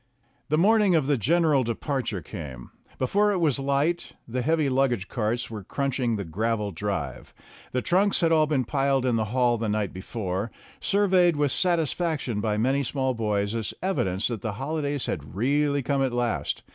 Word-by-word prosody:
The 155 Hz, -, +2 dB
morning 205 Hz, +1 st, +4 dB
of 155 Hz, -4 st, +2 dB
the 145 Hz, +1 st, +2 dB
general 150 Hz, -, +3 dB
departure 115 Hz, -, -2 dB
came. 70 Hz, -, -8 dB, 0.3 s
Before 205 Hz, +11 st, +2 dB
it -, -, 0 dB
was 155 Hz, -6 st, +1 dB
light 140 Hz, +5 st, 0 dB
the 125 Hz, +2 st, -2 dB
heavy 155 Hz, +2 st, +2 dB
luggage 130 Hz, -7 st, +1 dB
carts 120 Hz, 0 st, -2 dB
were 105 Hz, -3 st, -6 dB
crunching 130 Hz, +1 st, -1 dB
99 -, -, -1 dB
the 95 Hz, -5 st, -6 dB
gravel 110 Hz, +1 st, -1 dB
drive; 85 Hz, -7 st, -4 dB, 0.4 s
the 125 Hz, -, -1 dB
trunks 195 Hz, +3 st, +2 dB
had 165 Hz, -1 st, +3 dB
all 155 Hz, -1 st, +4 dB
been 140 Hz, -5 st, +1 dB
piled 135 Hz, 0 st, +1 dB
in 125 Hz, -2 st, +2 dB
the 110 Hz, -1 st, +1 dB
hall 120 Hz, +1 st, +1 dB
the 110 Hz, -1 st, -1 dB
night 105 Hz, -2 st, -1 dB
before, 95 Hz, +1 st, -4 dB, 0.3 s
surveyed 185 Hz, -4 st, +3 dB
with 145 Hz, -2 st, +1 dB
satisfaction 160 Hz, -, 0 dB
by 105 Hz, -1 st, 0 dB
many 135 Hz, +5 st, +2 dB
small 130 Hz, 0 st, -1 dB
boys 105 Hz, -2 st, -1 dB
as 115 Hz, -2 st, -3 dB
evidence 105 Hz, -, 0 dB
that 115 Hz, -5 st, -4 dB
the 110 Hz, -1 st, -3 dB
holidays 145 Hz, +3 st, -2 dB
had 75 Hz, +2 st, -5 dB
really 140 Hz, +5 st, +1 dB
come 140 Hz, +1 st, 0 dB
at 130 Hz, -2 st, 0 dB
last. 120 Hz, -2 st, -1 dB
130 Hz, 180 wpm, -26 LUFS, 110-150 Hz, 0.4 s, morning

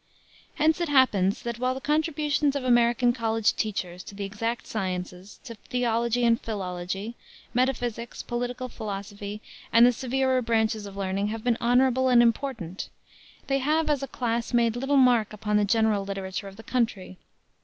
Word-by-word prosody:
Hence 315 Hz, +3 st, +2 dB
it 340 Hz, -, -1 dB
happens 215 Hz, -8 st, +3 dB
that, 235 Hz, -1 st, -4 dB
while 255 Hz, +1 st, 0 dB
the -, -, -5 dB
contributions 300 Hz, -1 st, 0 dB
of 280 Hz, -, -2 dB
American 240 Hz, 0 st, +3 dB
college 225 Hz, -2 st, +1 dB
teachers 180 Hz, -4 st, -3 dB
to 200 Hz, -, -10 dB
the 200 Hz, 0 st, -4 dB
exact 225 Hz, +4 st, -3 dB
sciences, 185 Hz, -1 st, -5 dB
to 230 Hz, -, -8 dB
theology 235 Hz, +1 st, 0 dB
and 230 Hz, 0 st, +3 dB
philology, 195 Hz, 0 st, -4 dB, 0.4 s
metaphysics, 245 Hz, -2 st, -1 dB
political 245 Hz, +1 st, -3 dB
philosophy 205 Hz, -1 st, -6 dB, 0.3 s
and 230 Hz, +1 st, +7 dB
the 245 Hz, -, +6 dB
severer 260 Hz, +1 st, 0 dB
branches 220 Hz, -2 st, 0 dB
of 200 Hz, 0 st, -10 dB
learning 195 Hz, +1 st, -1 dB
have 220 Hz, +1 st, -5 dB
been 240 Hz, -2 st, +2 dB
honorable 255 Hz, +2 st, +3 dB
and 240 Hz, -1 st, +6 dB
important, 230 Hz, -7 st, -2 dB, 0.6 s
they 275 Hz, 0 st, +1 dB
have 305 Hz, +3 st, +1 dB
as 285 Hz, -2 st, 0 dB
a 275 Hz, -, -3 dB
class 235 Hz, -1 st, -2 dB
made 235 Hz, -1 st, +3 dB
little 270 Hz, +3 st, +1 dB
mark 245 Hz, -5 st, +4 dB
upon 210 Hz, 0 st, 0 dB
the 210 Hz, -, +3 dB
general 215 Hz, -1 st, +2 dB
literature 195 Hz, 0 st, -5 dB
of 195 Hz, -, -10 dB
the 225 Hz, -, -12 dB
country. 215 Hz, -8 st, -2 dB
230 Hz, 165 wpm, -26 LUFS, 205-255 Hz, 0.6 s, and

